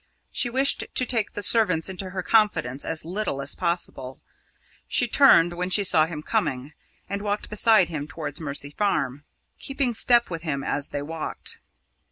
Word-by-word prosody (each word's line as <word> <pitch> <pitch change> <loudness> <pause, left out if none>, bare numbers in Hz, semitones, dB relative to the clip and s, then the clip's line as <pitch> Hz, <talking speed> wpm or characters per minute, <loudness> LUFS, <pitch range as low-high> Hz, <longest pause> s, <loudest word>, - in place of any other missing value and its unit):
She 245 - -1
wished 265 +3 +1
to 255 - +1
take 230 -4 -1
the 205 - -5
servants 185 -9 +5
into 190 0 -6
her 185 -1 -5
confidence 205 - +1
as 160 - -2
little 180 -5 -3
as 140 0 -1
possible. 170 -7 -4 0.7
She - - +1
turned 170 +1 +5
when 180 +1 -3
she 200 +2 +3
saw 160 -4 +5
him 155 -2 -7
coming, 150 - -2 0.3
and 200 0 -4
walked 205 0 -3
beside 215 -3 +3
him 150 -3 -5
towards 155 0 -6
Mercy 140 -1 -5
Farm, 145 -7 -2 0.3
keeping 275 -3 -1
step 235 -1 +2
with 165 -1 -4
him 145 -4 -3
as 145 - -2
they 145 -1 -4
walked. 160 +1 -5
175 Hz, 170 wpm, -24 LUFS, 145-210 Hz, 0.7 s, servants